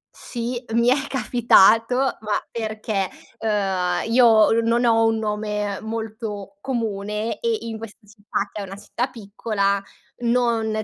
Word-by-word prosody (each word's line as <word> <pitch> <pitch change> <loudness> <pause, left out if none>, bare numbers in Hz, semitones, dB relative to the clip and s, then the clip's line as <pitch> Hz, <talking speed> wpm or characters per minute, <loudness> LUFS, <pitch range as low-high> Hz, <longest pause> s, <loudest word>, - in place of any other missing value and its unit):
Sì, 240 +1 -5
mi 235 +1 +4
è 270 +2 +2
capitato, 235 -2 +4
ma 230 -5 0
perché, 215 -4 -2 0.3
uhm, 195 -2 0
io 230 -3 +6
non 235 +2 +2
ho 225 -1 +4
un 225 0 +1
nome 210 -2 -2
molto 220 -3 -5
comune 215 -3 -3
e, 460 -2 0
in 225 -1 -6
questa 225 -2 -9
città, 205 -1 -4
che 210 - -6
è - - -4
una 195 0 -8
città 240 +5 -3
piccola, 200 -3 -1 0.4
non 230 -3 +1
220 Hz, 135 wpm, -22 LUFS, 205-235 Hz, 0.4 s, io